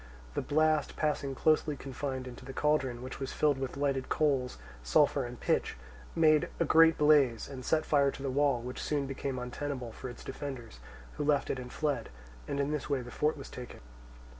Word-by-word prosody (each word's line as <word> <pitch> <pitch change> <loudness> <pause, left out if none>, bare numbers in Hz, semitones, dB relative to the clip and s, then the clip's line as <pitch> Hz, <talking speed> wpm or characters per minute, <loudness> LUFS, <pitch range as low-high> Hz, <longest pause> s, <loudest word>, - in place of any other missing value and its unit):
The - - -1
blast 155 +1 +2
passing 145 -3 -1
closely 155 0 +2
confined 130 -1 -4
into 125 0 -9
the 135 +1 -8
cauldron, 135 -5 +1
which 130 +1 -7
was 135 - -4
filled 145 -3 +2
with 135 0 -4
lighted 140 -2 0
coals, 135 -5 +1 0.2
sulphur 135 - +3
and 120 0 -9
pitch, - - 0 0.4
made 155 -2 +4
a - - +3
great 165 0 +6
blaze, 145 -6 +4
and 130 -2 -8
set 155 +4 +1
fire 140 -2 +4
to 135 - -7
the 135 - -1
wall, 140 -2 +2
which 125 +1 -6
soon 145 -2 0
became 135 0 -4
untenable 125 0 -4
for 130 - -7
its 120 - -10
defenders, 130 - -7 0.4
who - - -1
left 145 -1 +2
it 130 - -3
and 125 -1 -8
fled; 145 -7 -1 0.4
and 140 - -2
in 140 +1 0
this 150 -1 -3
way 140 -3 +1
the 120 - -9
fort 150 +4 0
was 140 - -8
taken. 125 -1 -8
140 Hz, 195 wpm, -31 LUFS, 130-150 Hz, 0.4 s, great